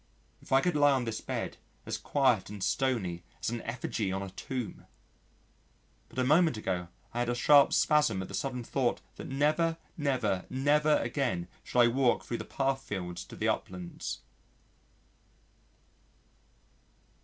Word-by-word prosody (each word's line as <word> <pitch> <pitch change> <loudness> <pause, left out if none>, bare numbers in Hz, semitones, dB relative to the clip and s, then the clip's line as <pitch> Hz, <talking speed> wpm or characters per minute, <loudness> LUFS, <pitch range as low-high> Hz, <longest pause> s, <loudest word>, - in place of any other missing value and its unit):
If - - -16
I 135 0 +6
could 180 +1 +1
lie 145 -1 +5
on 130 -2 0
this 110 -1 -3
bed - - -4 0.3
as - - -3
quiet 130 -10 +2
and 100 -2 -6
stony 110 -11 0 0.2
as - - -2
an 120 -1 -3
effigy 115 -3 -2
on 95 +1 -2
a 95 - -7
tomb! 120 +6 -5 1.2
But - - -15
a 130 - +2
moment 155 0 +4
ago 90 -4 -2 0.3
I 120 - -2
had 120 0 0
a 120 - +1
sharp 140 +3 +6
spasm 150 -10 +3
at - - -7
the - - -10
sudden 125 -3 -2
thought 125 +1 0 0.2
that - - -7
never, 155 +4 +1 0.2
never, 130 - 0
never 150 +3 +3
again 120 -8 -1 0.2
should 125 - +2
I 120 - +7
walk 125 +1 +2
thro' 120 - -3
the - - -5
path 135 -1 -1
fields 90 -7 -5
to - - -11
the - - -1
uplands. 90 -2 -4
125 Hz, 155 wpm, -30 LUFS, 105-140 Hz, 1.2 s, I